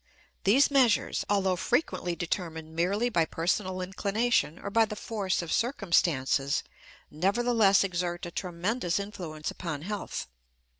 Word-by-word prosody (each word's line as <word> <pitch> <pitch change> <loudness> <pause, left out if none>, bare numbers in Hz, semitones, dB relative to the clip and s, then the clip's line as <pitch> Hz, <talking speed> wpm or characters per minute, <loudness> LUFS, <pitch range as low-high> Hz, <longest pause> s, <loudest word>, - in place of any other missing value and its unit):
These 260 +9 +5
measures, 255 -7 +3
although 195 -2 +2
frequently 180 - 0
determined 160 -2 -4
merely 200 +8 +1
by 190 -9 +2
personal 185 +4 -1
inclination 200 -1 0
or 200 - -6
by 225 +1 +4
the 210 - -6
force 200 -4 -2
of 165 - -3
circumstances, 165 - +1 0.5
nevertheless 200 +4 +3
exert 175 -2 -2
a 175 - -6
tremendous 180 +2 -1
influence 175 -7 -5
upon 155 -4 -5
health. 205 +2 -4
185 Hz, 120 wpm, -28 LUFS, 170-210 Hz, 0.5 s, These